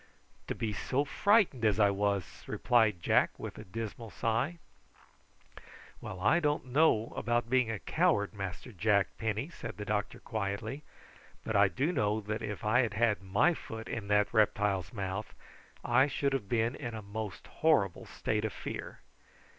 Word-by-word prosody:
"To - - -2
be 110 -2 -2
so 135 +7 0
frightened 200 - +3
as 105 -1 +3
I 100 -1 +5
was," 100 -2 -1
replied 110 -7 +2
Jack, - - +3
with - - -7
a - - -7
dismal 115 +3 -6
sigh. 115 +11 -1 1.4
"Well, 95 - -7
I 115 - +4
don't 150 -4 0
know 130 -4 +3
about 120 +1 0
being 125 -3 +3
a 110 - -2
coward, 155 - +1
Master 95 +2 -6
Jack 100 0 +1
Penny," 110 - -2
said 160 - -8
the 105 - -5
doctor 105 0 -2
quietly; 110 +5 -3 0.6
"but 110 - -3
I 100 0 +6
do 135 - 0
know 105 -9 +1
that 110 +1 -4
if 105 +1 -5
I 110 +4 +4
had 115 -5 +1
had 110 -2 +2
my 100 - +3
foot 110 -7 -8
in 110 -3 -4
that 105 +1 +2
reptile's 100 -5 +2
mouth 100 0 -4 0.5
I 135 - +4
should 140 0 0
have 105 -8 -2
been 115 0 +1
in 120 -5 -5
a 110 - -6
most 105 0 -6
horrible 135 - +1
state 105 0 -2
of 110 - -2
fear. - - -6
110 Hz, 165 wpm, -31 LUFS, 100-125 Hz, 1.4 s, I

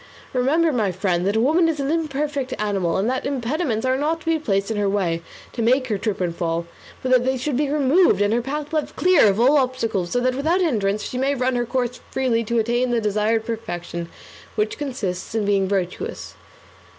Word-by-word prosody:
Remember, 295 +6 +2
my 215 -6 +1
friend, 180 -1 0
that 205 +2 +1
woman 320 +8 +3
is 310 -2 -2
an 275 +1 -1
imperfect 290 -4 -2
animal, 195 -5 0
and 195 +3 0
that 260 +1 -1
impediments 265 -2 -1
are 260 0 +2
not 315 +4 -1
to - - -16
be 325 -1 +1
placed 200 -6 -1
in 220 - -2
her 205 -1 +1
way 180 -5 0 0.3
to 235 - -3
make 255 +3 +2
her 210 -3 -1
trip 210 -1 -2
and 175 -2 -1
fall, 170 0 -2 0.4
but 255 - -1
that 250 -1 +5
they 260 +1 0
should 265 +2 -2
be 285 +2 0
removed, 290 - +3
and 205 +1 +2
her 240 - +2
path 290 +4 -5
left 310 -2 -1
clear 360 -10 +5
of 200 +1 +2
all 275 +5 +5
obstacles, 230 -8 -1
so 245 - 0
that 255 +1 +1
without 315 +8 +1
hindrance 210 - 0
she 250 - -4
may 275 +2 +1
run 255 0 0
her 240 -1 -1
course 250 -1 -2
freely 245 -3 0
to 235 +2 -1
attain 240 +3 +1
the 240 -1 +1
desired 215 +1 0
perfection, 175 -7 -5 0.5
which 210 +4 -1
consists 225 -10 -4
in 220 -2 +1
being 200 -1 +2
virtuous. 195 - -3
240 Hz, 210 wpm, -22 LUFS, 205-275 Hz, 0.5 s, that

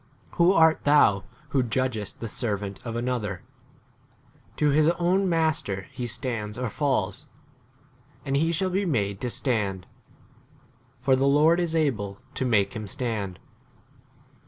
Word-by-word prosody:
Who 175 +1 +4
art 160 -3 +4
thou 115 -9 +4 0.2
who 140 -2 +2
judgest 120 -3 -2
the 115 - -3
servant 100 -3 -3
of 115 -1 -5
another? 120 -6 -2 1.1
to 150 - +2
his 155 +2 +4
own 185 +2 +2
master 155 - 0
he 125 - -4
stands 110 -2 -3
or 125 -1 -2
falls. 135 -1 -1 1.0
And 135 -1 -1
he 160 +4 +2
shall 185 +3 0
be 195 +3 +1
made 100 - -1
to 125 - -1
stand; 105 -8 -1 1.1
for 130 +2 +2
the 135 +1 +2
Lords 155 +5 +4
is 165 -2 -1
able 110 -11 0 0.2
to 130 - -2
make 105 -5 +3
5 - - -15
him 105 -1 -6
stand. 100 -5 -3
125 Hz, 140 wpm, -26 LUFS, 105-150 Hz, 1.1 s, Who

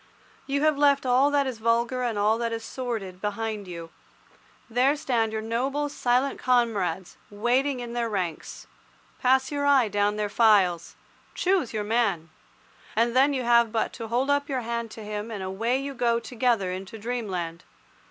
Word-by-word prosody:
You 280 +1 0
have 310 -2 +2
left 280 -2 +4
all 255 +3 +4
that 285 -1 +2
is 255 -4 -4
vulgar 235 +3 +1
and 235 -4 -1
all 215 +2 +2
that 230 -1 -1
is 225 0 -4
sordid 225 -8 -5
behind 210 -1 -3
you. 170 -2 -8 0.8
There 250 +5 +2
stand 240 -7 0
your 220 0 -3
noble, 270 +6 -1
silent 255 0 0
comrades, 210 -8 0
waiting 250 +5 0
in 240 -1 -6
their 235 -1 -1
ranks. 180 -6 -4 0.5
Pass 265 +2 +2
your 285 -1 -1
eye 265 -6 +4
down 205 0 +1
their 210 0 -1
files. 200 -6 +3 0.4
Choose 370 - +1
your 215 -2 -2
man. 205 -8 0 0.6
And 235 +2 +2
then 270 +3 +5
you 260 -2 -1
have 235 -1 +4
but 225 -1 -1
to 230 -1 -6
hold 250 +5 0
up 285 0 0
your 265 -2 -1
hand 235 0 -3
to 220 0 -10
him 210 +1 -5
and 205 -4 -5
away 225 +7 -1
you 275 0 -5
go 235 -2 +1
together 235 -5 0
into 190 +4 -7
dreamland. 195 -8 -4
235 Hz, 170 wpm, -26 LUFS, 210-255 Hz, 0.8 s, then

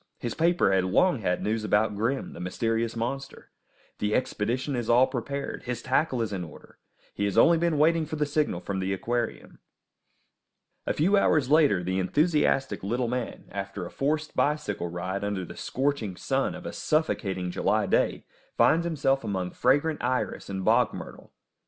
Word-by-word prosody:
His 120 - -4
paper 170 - +2
has 95 -1 +3
long 125 - +3
had 90 -4 -1
news 110 +1 -1
about 105 0 +2
Grim, 115 +6 -2
the - - -10
mysterious 115 +6 -1
monster. 130 +4 -5 0.5
The 105 0 0
expedition 130 +4 -1
is 120 -2 -3
all 120 +2 +6
prepared, 140 +2 -4
his 120 -2 -4
tackle 130 -2 +1
is 105 -2 -4
in 95 -2 -3
order; 80 - -13 0.3
he 100 - -1
has 100 - -1
only 170 -1 +6
been 170 -2 +1
waiting 160 +1 +3
for 155 - -4
the 150 -1 0
signal 145 - -1
from 100 -1 -3
the 95 +1 -1
aquarium. 120 +4 -3 1.3
A - - +1
few 190 +7 +3
hours 150 -8 +2
later 145 - +4
the 95 +2 -1
enthusiastic 145 - +1
little 120 +5 -1
man, 125 0 -4
after 100 -1 -5
a - - -8
forced 155 +3 -1
bicycle 150 - 0
ride 90 +3 -4
under 100 -3 -2
the - - -10
scorching 130 -8 -2
sun - - -1
of - - -10
a - - -5
suffocating 95 - -1
July - - +1
day, - - +1 0.3
finds 170 +1 +4
himself 135 -5 +1
among 95 -4 -2
fragrant 145 +4 +1
iris 125 +1 -2
and 95 -1 -4
bog - - +3
myrtle. - - -10
120 Hz, 170 wpm, -27 LUFS, 100-145 Hz, 1.3 s, all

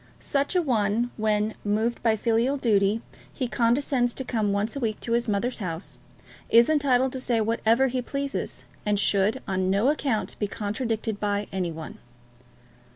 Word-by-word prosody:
Such 280 +4 -1
a 360 - +3
one, 230 -2 +1
when, 215 0 +1
moved 220 +3 0
by 225 -2 +3
filial 235 +5 +1
duty, 215 -3 +2 0.3
he 255 - -3
condescends 245 +1 +1
to 265 - -4
come 220 -5 0
once 205 +4 -1
a - - -2
week 220 -4 -2
to 230 - -4
his 235 +1 +1
mother's 225 +5 -1
house, 175 -3 -4 0.5
is 235 +5 +6
entitled 265 -4 +2
to 260 - -3
say 245 -3 0
whatever 230 +3 +2
he 255 -1 -1
pleases, 275 +2 -4 0.2
and 210 -1 +1
should 205 +5 +2
on 185 -1 0
no 200 +7 +3
account 275 -7 -1
be 205 - 0
contradicted 220 +1 -3
by 205 0 0
any 180 -3 -1
one. 160 -1 -8
225 Hz, 165 wpm, -26 LUFS, 205-255 Hz, 0.5 s, is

